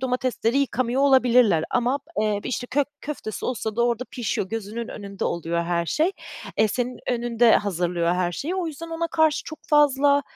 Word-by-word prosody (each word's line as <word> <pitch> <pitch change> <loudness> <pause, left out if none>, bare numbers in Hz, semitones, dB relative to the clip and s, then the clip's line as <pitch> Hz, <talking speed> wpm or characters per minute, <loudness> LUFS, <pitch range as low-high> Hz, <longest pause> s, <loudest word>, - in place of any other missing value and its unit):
domatesleri 255 -1 0
yıkamıyor 255 -1 0
olabilirler 250 - +4
ama 250 +3 +1 0.2
b - - +3
eee, 210 -1 0
işte 245 0 -3
kök 275 +2 +1
köftesi 275 -7 -5
olsa 220 -3 -3
da 235 - +3
orda 240 +1 -1
pişiyor, 235 -7 -2
gözünün 225 +2 -5
önünde 200 -2 -6
oluyor 170 0 -1
her 170 0 -1
şey, 320 - +1 0.4
e, 215 - +4
senin 245 +3 -2
önünde 240 -1 +3
hazırlıyor 175 -3 0
her 180 -1 0
şeyi. 310 - -3
O 370 -2 -1
yüzden 325 +1 -7
ona 330 0 -2
karşı 315 -1 +2
çok 315 - -8
fazla 285 -1 +4
245 Hz, 175 wpm, -24 LUFS, 205-280 Hz, 0.4 s, olabilirler